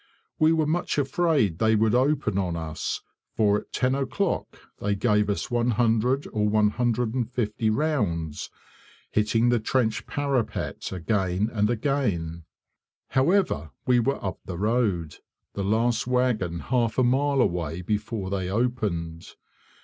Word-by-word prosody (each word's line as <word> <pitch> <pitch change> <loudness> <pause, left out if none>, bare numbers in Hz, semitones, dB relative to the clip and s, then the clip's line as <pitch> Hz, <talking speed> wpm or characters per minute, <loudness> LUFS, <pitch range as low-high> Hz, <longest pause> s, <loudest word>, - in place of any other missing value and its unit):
We 155 +1 +5
were 160 -1 +2
much 165 +2 -1
afraid 145 - +1
they 110 0 +3
would 110 +1 +2
open 130 -6 +2
on 90 -3 -1
us, 80 -2 -4 0.3
for 105 -1 +3
at - - -16
10 130 0 +1
o'clock 140 +8 -2 0.2
they 100 0 0
gave 105 -1 +2
us 100 - -2
100 120 +2 +1
or 105 -1 +1
150 115 +1 0
rounds, 105 - -1 0.6
hitting 115 +3 +2
the 120 -1 +3
trench 110 0 0
parapet 140 -5 -2
again 95 +2 0
and 105 -1 +1
again. 105 - -1 0.6
However, 135 - +2 0.2
we 125 -1 +4
were 130 -2 -1
up 95 - -3
the 90 - -6
road, 100 -6 0 0.4
the 100 - -3
last 115 +4 +1
wagon 120 -10 0
half 120 - 0
a 130 - +4
mile 135 +3 +2
away 85 - 0
before 105 0 -2
they 95 -2 -2
opened. 100 -8 -2
110 Hz, 130 wpm, -26 LUFS, 100-125 Hz, 0.6 s, We